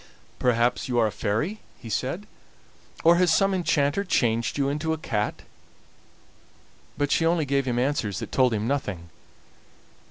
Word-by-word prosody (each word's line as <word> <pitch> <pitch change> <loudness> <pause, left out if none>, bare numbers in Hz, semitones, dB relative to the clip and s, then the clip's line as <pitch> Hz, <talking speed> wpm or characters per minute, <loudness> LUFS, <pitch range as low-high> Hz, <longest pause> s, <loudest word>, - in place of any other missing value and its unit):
"Perhaps 120 +1 +1
you 120 - 0
are 115 - +4
a 110 - 0
fairy," 115 - -2 0.2
he - - -12
said. 130 - -2 0.8
"Or 170 +1 +6
has 180 -2 +3
some 195 +3 +3
enchanter 165 -1 +1
changed 115 - 0
you 140 -1 +1
into 150 +3 -1
a - - -3
cat?" 105 -8 -3 1.5
But 145 -1 0
she - - +2
only 165 -1 +2
gave 140 -1 0
him 120 -1 0
answers 125 -7 0
that - - -6
told 130 -2 +3
him 110 0 -1
nothing. 100 -11 -3
135 Hz, 155 wpm, -25 LUFS, 115-160 Hz, 1.5 s, Or